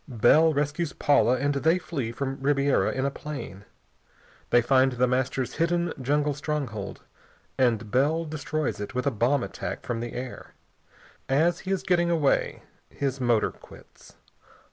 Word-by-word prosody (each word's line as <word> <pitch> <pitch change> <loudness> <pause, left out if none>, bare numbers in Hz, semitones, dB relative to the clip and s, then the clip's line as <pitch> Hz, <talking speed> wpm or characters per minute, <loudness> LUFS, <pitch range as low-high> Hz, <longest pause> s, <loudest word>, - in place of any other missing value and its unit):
Bell 145 +6 +4
rescues 150 +2 -1
Paula, 130 -3 +3
and 145 +2 0
they 160 +5 +2
flee 145 -9 -4
from 135 +2 -4
Ribiera 140 0 +2
in 130 +1 -2
a 140 - 0
plane. 140 -10 -8 0.8
They 120 - +4
find 130 +1 +3
The 125 +1 +2
Master's 130 0 -1
hidden 170 +1 +1
jungle 145 +3 +1
stronghold, 135 -9 -4 0.5
and 115 -4 +1
Bell 155 +6 +2
destroys 155 -3 -3
it 105 +4 -6
with 125 - -1
a 140 - +2
bomb 120 +4 +1
attack - - -5
from 120 -2 -2
the 120 0 -5
air. 125 0 -7 0.7
As 165 +6 +2
he - - 0
is 195 - 0
getting 175 -2 +2
away 160 -5 +1 0.3
his 135 -1 -3
motor 120 -3 +2
quits. - - -17
140 Hz, 150 wpm, -26 LUFS, 125-150 Hz, 0.8 s, Bell